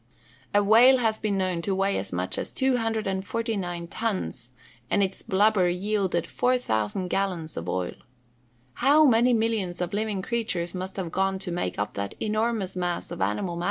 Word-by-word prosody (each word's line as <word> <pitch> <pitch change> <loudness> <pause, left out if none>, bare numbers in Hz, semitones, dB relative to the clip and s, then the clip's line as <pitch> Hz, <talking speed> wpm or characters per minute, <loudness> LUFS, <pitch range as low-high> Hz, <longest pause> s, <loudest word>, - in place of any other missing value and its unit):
A 205 0 +3
whale 235 +6 +7
has 225 -3 0
been 205 -2 -1
known 185 -3 0
to 195 +2 -1
weigh 195 +1 +1
as 95 0 -5
much 90 +1 -2
as - - -4
249 220 -6 -1
tons, 185 - -3 0.4
and 200 - +3
its 190 0 -2
blubber 195 -2 +3
yielded 190 -1 0
4,000 190 - 0
gallons 180 -5 -2
of 85 +2 -5
oil. 90 0 -2 0.8
How 290 - +5
many 245 -1 +5
millions 220 -6 -1
of 180 +1 -3
living 205 -2 -1
creatures 185 -7 -2
must 185 +1 -5
have 180 -4 -3
gone 195 +1 0
to 190 -1 -4
make 90 - -2
up 105 +1 -2
that 100 0 -4
enormous 215 -3 -1
mass 175 -1 -2
of - - -6
animal 105 - -1
matter! - - -4
195 Hz, 165 wpm, -26 LUFS, 175-220 Hz, 0.8 s, whale